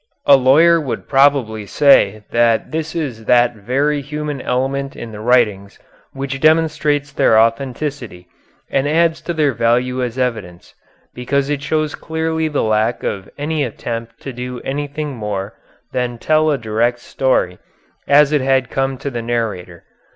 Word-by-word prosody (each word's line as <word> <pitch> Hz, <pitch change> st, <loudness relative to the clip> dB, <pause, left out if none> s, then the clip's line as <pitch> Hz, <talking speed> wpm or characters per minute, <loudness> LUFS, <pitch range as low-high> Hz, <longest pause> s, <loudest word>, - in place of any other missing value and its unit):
A 140 Hz, -, +8 dB
lawyer 155 Hz, +6 st, +5 dB
would 135 Hz, -5 st, -5 dB
probably 135 Hz, -7 st, +2 dB
say 110 Hz, -5 st, +4 dB
that 115 Hz, -1 st, +2 dB
this 160 Hz, +1 st, -4 dB
is 130 Hz, -9 st, -4 dB
that 120 Hz, 0 st, +4 dB
very 140 Hz, +8 st, -1 dB
human 150 Hz, 0 st, -5 dB
element 135 Hz, +2 st, -2 dB
in 115 Hz, -, -8 dB
the 105 Hz, -, -9 dB
writings 105 Hz, -4 st, +1 dB, 0.3 s
which 135 Hz, 0 st, -5 dB
demonstrates 155 Hz, -2 st, +2 dB
their 110 Hz, -5 st, +3 dB
authenticity 120 Hz, -4 st, -2 dB, 0.4 s
and 135 Hz, +1 st, +1 dB
adds 165 Hz, +2 st, +2 dB
to -, -, -4 dB
their 150 Hz, -4 st, +1 dB
value 125 Hz, +3 st, +1 dB
as 125 Hz, 0 st, -3 dB
evidence, 110 Hz, -9 st, -4 dB, 0.4 s
because 140 Hz, +3 st, -1 dB
it 145 Hz, -1 st, -2 dB
shows 155 Hz, +1 st, -1 dB
clearly 160 Hz, 0 st, -2 dB
the 150 Hz, -2 st, -1 dB
lack 110 Hz, +2 st, 0 dB
of 95 Hz, -1 st, -4 dB
any 150 Hz, +1 st, -1 dB
attempt 115 Hz, -1 st, -6 dB
to 135 Hz, -, -7 dB
do 125 Hz, 0 st, -6 dB
anything 145 Hz, +1 st, -4 dB
more 105 Hz, -2 st, -4 dB, 0.4 s
than 125 Hz, -1 st, -2 dB
tell 155 Hz, +5 st, +2 dB
a 145 Hz, -, +1 dB
direct 115 Hz, +1 st, 0 dB
story 120 Hz, -8 st, -1 dB, 0.5 s
as 145 Hz, +1 st, +5 dB
it 150 Hz, -2 st, +2 dB
had 130 Hz, -1 st, +1 dB
come 135 Hz, 0 st, -1 dB
to 140 Hz, +1 st, -5 dB
the 120 Hz, -2 st, -4 dB
narrator. 110 Hz, -7 st, -4 dB
130 Hz, 150 wpm, -18 LUFS, 115-145 Hz, 0.5 s, A